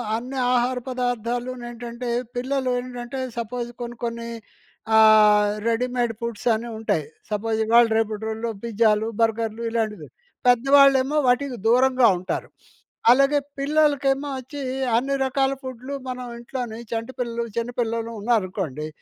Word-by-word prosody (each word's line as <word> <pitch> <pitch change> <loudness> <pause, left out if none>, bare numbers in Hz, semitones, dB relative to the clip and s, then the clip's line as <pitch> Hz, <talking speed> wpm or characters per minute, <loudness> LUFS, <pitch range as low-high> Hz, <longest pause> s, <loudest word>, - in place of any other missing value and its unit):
అన్ని 255 +4 -5 0.2
ఆహార 250 +1 +1
పదార్థాలు 245 0 -2
నేంటంటే 240 0 -6 0.3
పిల్లలు 260 +1 -1
ఏంటంటే 245 +1 -6 0.2
సపోజ్ 240 +1 -3
కొన్ని 240 0 -6
కొన్ని 235 0 -4 0.7
ఆహ్, 210 -1 +6 0.2
రెడీమేడ్ 245 0 0
ఫుడ్స్ 235 -2 -5
అని 235 +2 -5
ఉంటాయి. 160 -9 -1 0.2
సపోజ్ 220 +1 -1
ఇవాళ 235 +2 +6
రేపటి 220 -1 -1
రోజుల్లో 225 +1 -3
పిజ్జాలు, 220 -1 +2
బర్గర్లు 225 0 0
ఇలాంటివి. 215 -7 -2 0.4
పెద్దవాళ్లేమో 275 +3 +5
వాటికి 250 +1 +1
దూరంగా 255 +1 +5
ఉంటారు. 185 +2 -4 0.6
అలాగే 275 +3 +4 0.2
పిల్లలకేమో 285 -1 +2
వచ్చి 260 +3 -8 0.4
అన్ని 275 +3 0
రకాల 270 +1 +1
ఫుడ్లు, 260 +1 -7 0.2
మనం 250 0 -5
ఇంట్లోనే 240 -2 -5
చంటి 230 +3 -3
పిల్లలు 235 -1 -2
చిన్నపిల్లలుంన్నారనుకోండి, 225 - -2
240 Hz, 115 wpm, -23 LUFS, 225-255 Hz, 0.7 s, ఆహ్